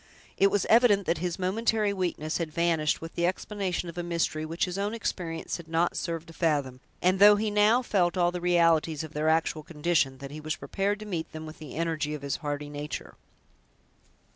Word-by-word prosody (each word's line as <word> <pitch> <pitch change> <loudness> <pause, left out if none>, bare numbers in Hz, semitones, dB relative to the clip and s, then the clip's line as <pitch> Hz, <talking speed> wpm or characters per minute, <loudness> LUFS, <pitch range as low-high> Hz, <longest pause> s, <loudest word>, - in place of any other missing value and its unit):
It 195 - +4
was 205 -1 +1
evident 220 -4 +5
that 170 - 0
his 175 0 -2
momentary 210 +2 +1
weakness 175 -5 -2
had 165 -2 -3
vanished 165 -2 +1
with 165 0 -7
the 170 0 +1
explanation 185 -1 -2
of 170 +1 -6
a - - 0
mystery 170 -2 -1
which 165 +2 0
his 180 +1 -4
own 205 +3 -1
experience 165 -7 -3
had 170 -2 -11
not 165 +2 +1
served 165 -2 -3
to - - -11
fathom; 145 -7 0 0.2
and 185 +1 +3
though 205 +1 +9
he 215 +1 -1
now 210 +4 +4
felt 180 -6 +1
all 175 -1 +3
the 180 0 -5
realities 165 -3 +3
of 160 -1 -9
their 155 +1 +1
actual 160 -1 +1
condition, 150 -3 0
that 140 0 -8
he 155 +1 -7
was 155 0 -2
prepared 200 +1 -1
to - - -6
meet 170 -6 -4
them 155 0 -6
with 155 +1 -10
the 155 -4 -9
energy 155 -2 -1
of 145 - -9
his 140 - -2
hardy 145 -1 -4
nature. 145 -1 -6
170 Hz, 210 wpm, -28 LUFS, 155-190 Hz, 0.2 s, though